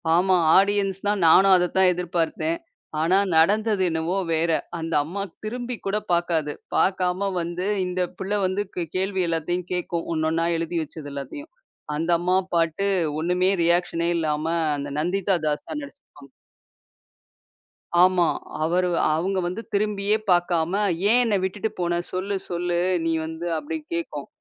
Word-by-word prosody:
ஆமா, 185 +2 +3 0.2
ஆடியன்ஸ்ன்னா 200 0 +2 0.2
நானும் 190 +4 +7
அதத்தான் 180 +1 +3
எதிர்பார்த்தேன். 175 - -1 0.4
ஆனா 175 +4 +3 0.2
நடந்தது 210 +4 +3
என்னவோ 165 +3 -1 0.2
வேற. 165 +1 +2 0.3
அந்த 165 0 -4
அம்மா 185 +6 -5 0.2
திரும்பிக்கூடப் 220 -3 -4
பாக்காது. 170 -3 +1 0.2
பாக்காம 185 +1 +1
வந்து 175 +2 -4 0.2
இந்தப் 180 -1 -2
புள்ள 190 +2 -3
வந்து 190 +2 0
க் 175 -2 -2
கேள்வி 190 0 +1
எல்லாத்தையும் 170 +2 -1
கேக்கும், 175 -1 -3
ஒண்ணொண்ணா 160 +1 0
எழுதி 165 +1 -2
வச்சது 150 -1 -9
எல்லாத்தையும். 140 - -7 0.5
அந்தம்மா 175 +3 +1 0.2
பாட்டு, 165 +4 +1 0.3
ஒண்ணுமே 180 +3 +1
ரீயாக்ஷனே 170 0 +2
இல்லாம, 155 -1 -1 0.3
அந்த 145 0 -5
நந்திதா 190 +4 +1
தாஸ் 150 -1 -2
தான் 300 - -4
நடிச்சிருப்பாங்க. 285 0 -15 1.7
ஆமா, 180 -1 +4 0.4
அவரு 180 +3 +1 0.3
அவங்க 190 +4 -1
வந்து 185 +6 -4
திரும்பியே 205 0 +1 0.2
பாக்காம, 175 -1 +1 0.4
"ஏன் 245 +2 +6
என்ன 220 -3 +1
விட்டுட்டு 205 +3 -2
போன? 175 -1 0
சொல்லு 195 +2 -2
சொல்லு 175 0 -1 0.3
நீ 165 - +1
வந்து" 160 +1 -6
அப்படி 320 - -4 0.2
கேக்கும். 340 0 -4
180 Hz, 130 wpm, -24 LUFS, 165-195 Hz, 1.7 s, நானும்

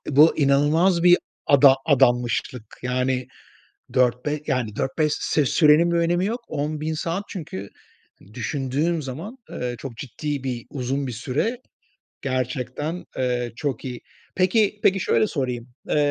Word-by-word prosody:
Bu 155 +3 +6
inanılmaz 155 +5 +3
bir 175 0 +7 0.3
ada 140 -1 +7
adanmışlık. 120 -4 +1
Yani, 125 0 0 0.7
4 125 -1 +2
be 150 0 -1
yani, 125 -7 -1
4-5 150 +5 0
se 150 -3 +1
sürenin 160 +3 +5
bir - - +1
önemi 175 +2 +2
yok. 235 +4 -2
10.000 155 +2 -2
saat 170 +5 -2
çünkü 100 - -6 0.6
düşündüğüm 140 +7 -1
zaman, 160 - -7
eee, 125 -1 -4
çok 130 -4 -8
ciddi 140 +2 -4
bir 125 -3 -4
uzun 135 0 -2
bir - - -3
süre. 145 - -2 0.6
Gerçekten, 130 +5 -3
eee, 125 -2 -1
çok 135 -3 -3
iyi. 125 -2 -6 0.3
Peki, 205 +3 +2
peki, 195 0 +4
şöyle 115 -9 +2
sorayım. 125 -3 -3 0.2
Eee, - - +2
140 Hz, 135 wpm, -23 LUFS, 125-165 Hz, 0.7 s, bir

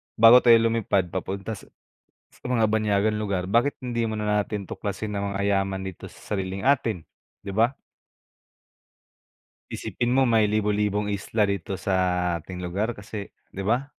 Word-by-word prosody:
bago 115 +3 +8
tayo 120 -2 +7
lum 115 0 +2
bago - - -6
tayo 95 - +3
lumipad - - -10
papunta 95 +3 -4
sa 105 - -8 0.8
mga 115 -4 +2
banyagang 105 0 +1
lugar 100 -4 -2
bakit 120 +7 +3
hindi 120 -2 -1
mo 110 - -2
na 105 -1 -2
natin 100 -2 -5
tuklasin 105 +1 -4
ang 100 0 -2
mga 100 - -2 0.2
yaman 95 0 -2
dito 95 -2 -7
sa - - -9
sariling 95 0 -3
atin, 120 -9 +2 0.4
di - - -8
ba? 115 +6 +2 2.0
Isipin 120 - -3
mo 130 +2 +3
may 110 -3 +3
libo-libong 105 -1 0
isla 105 +2 0
dito 100 -1 -3
sa 95 +1 -2 0.5
ating 90 +3 -9
lugar, 95 +6 -3
kasi 100 0 -7 0.2
di 100 - -5
ba, 120 +7 +1
105 Hz, 165 wpm, -25 LUFS, 100-115 Hz, 2.0 s, bago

